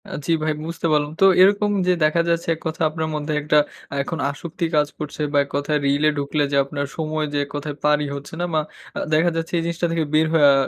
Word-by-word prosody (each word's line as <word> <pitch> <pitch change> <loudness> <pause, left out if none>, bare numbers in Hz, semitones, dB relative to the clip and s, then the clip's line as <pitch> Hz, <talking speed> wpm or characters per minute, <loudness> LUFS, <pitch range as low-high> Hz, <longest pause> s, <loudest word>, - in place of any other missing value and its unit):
অ্যাঁ 190 - -6
জ্বি 165 - +2
ভাই 155 0 +1
বুঝতে 165 +1 -5
পারলাম। 150 -1 +1
তো - - +8 0.2
এরকম 205 +2 +5 0.2
যে 180 - +5
দেখা 155 +2 +3
যাচ্ছে 170 0 0
এক - - -16
কথা 160 +2 -5
আপনার 160 0 -3
মধ্যে 150 0 -3
একটা 150 +1 +2 0.4
এখন 165 +4 -4
আসক্তি 160 +4 -4
কাজ 150 -1 +3
করছে 150 0 -5
বা - - +3
এক - - -19
কথায় 145 +1 0
রিলে 145 +2 +3
ঢুকলে 145 +1 0
যে 140 - +2
আপনার 140 0 -4
সময় 155 -1 -1
যে - - 0
এক - - -18
কথায় 145 0 -4
পারই 150 0 +2
হচ্ছে 140 +2 -9
না - - +1
মা 155 - +3 0.5
দেখা 160 +3 +4
যাচ্ছে 165 +1 -3
এই - - +1
জিনিসটা 170 +1 -1
থেকে 165 -1 0
বের 155 +1 +4
হয়ে 155 -3 +5
আ - - +5
155 Hz, 235 wpm, -22 LUFS, 145-165 Hz, 0.5 s, তো